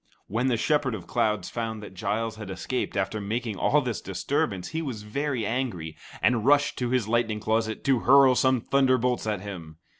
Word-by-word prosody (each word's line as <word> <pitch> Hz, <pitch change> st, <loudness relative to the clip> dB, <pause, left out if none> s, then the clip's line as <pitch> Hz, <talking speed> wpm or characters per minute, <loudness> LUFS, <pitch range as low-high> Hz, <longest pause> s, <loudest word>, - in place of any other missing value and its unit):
When 120 Hz, +5 st, -1 dB
the 120 Hz, -3 st, +2 dB
Shepherd 145 Hz, -2 st, +1 dB
of 90 Hz, -5 st, -8 dB
Clouds 105 Hz, -4 st, 0 dB
found 110 Hz, -2 st, -4 dB
that 105 Hz, -, -10 dB
Giles 105 Hz, +4 st, -2 dB
had 105 Hz, -3 st, -7 dB
escaped 100 Hz, +4 st, -3 dB
after 100 Hz, +2 st, -1 dB
making 110 Hz, +1 st, -3 dB
all 150 Hz, +8 st, +3 dB
this 125 Hz, -5 st, -3 dB
disturbance, 95 Hz, -2 st, -2 dB
he 160 Hz, +1 st, -3 dB
was 125 Hz, -9 st, -5 dB
very 130 Hz, +1 st, -2 dB
angry, 100 Hz, -10 st, -3 dB, 0.3 s
and 120 Hz, -3 st, +3 dB
rushed 145 Hz, +3 st, +4 dB
to 125 Hz, -1 st, -1 dB
his 125 Hz, -4 st, +1 dB
lightning 110 Hz, -1 st, +1 dB
closet 110 Hz, +1 st, -1 dB
to 135 Hz, -3 st, +3 dB
hurl 135 Hz, +1 st, +6 dB
some 130 Hz, -1 st, +2 dB
thunderbolts 130 Hz, -3 st, +2 dB
at 105 Hz, -3 st, -1 dB
him. 85 Hz, -6 st, -8 dB
115 Hz, 185 wpm, -26 LUFS, 105-130 Hz, 0.3 s, hurl